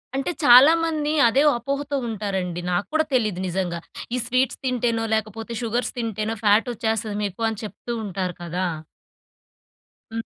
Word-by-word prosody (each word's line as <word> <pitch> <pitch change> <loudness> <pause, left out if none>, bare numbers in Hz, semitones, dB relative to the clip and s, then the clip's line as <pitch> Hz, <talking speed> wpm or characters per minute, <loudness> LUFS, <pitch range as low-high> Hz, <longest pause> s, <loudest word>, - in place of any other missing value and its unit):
అంటే, 275 +6 -1
చాలా 265 +5 +9
మంది 305 -2 -1 0.2
అదే 260 +4 +3 0.2
అపోహతో 280 +4 -3
ఉంటారండి. 190 -5 -3
నాకు 175 +3 0
కూడా 315 0 +2
తెలీదు 215 -7 0
నిజంగా. 175 -1 -2 0.4
ఈ - - 0
స్వీట్స్ 255 +1 0
తింటేనో, 235 -3 0
లేకపోతే 220 +2 -4
షుగర్స్ 235 +2 -1
తింటేనో 220 -1 -2
ఫ్యాట్ 215 +3 +4
వచ్చేస్తది 220 -2 -2
మీకు 200 +2 -6
అని 220 -2 -5
చెప్తూ 240 +3 -6
ఉంటారు 185 -2 -3
కదా! 180 +2 -2 1.4
హ్మ్. 225 0 -4
225 Hz, 140 wpm, -23 LUFS, 200-250 Hz, 1.4 s, చాలా